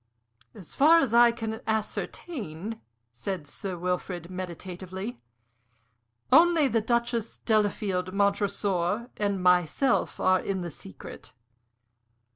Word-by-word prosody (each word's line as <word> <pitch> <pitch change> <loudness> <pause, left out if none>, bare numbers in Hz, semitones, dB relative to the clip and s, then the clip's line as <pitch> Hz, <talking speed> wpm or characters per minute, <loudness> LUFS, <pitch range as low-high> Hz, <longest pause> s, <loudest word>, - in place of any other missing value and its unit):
"As 190 -7 -10
far 315 +4 +6
as 265 -8 0
I 235 0 +7
can 225 -1 -5
ascertain," 220 - -4 0.3
said 150 +8 -5
Sir 180 +5 -5
Wilfrid, 180 0 -3
meditatively, 185 +3 -6 1.1
"only 335 -3 +6
the 225 -3 +1
Duchess, 235 0 -1
Delafield, 205 -4 0
Montresor, 200 +1 0
and 200 -3 -1
myself 180 - +2
are 185 0 +3
in 190 0 -3
the 175 -1 -5
secret." 95 -8 -11
200 Hz, 100 wpm, -27 LUFS, 180-230 Hz, 1.1 s, I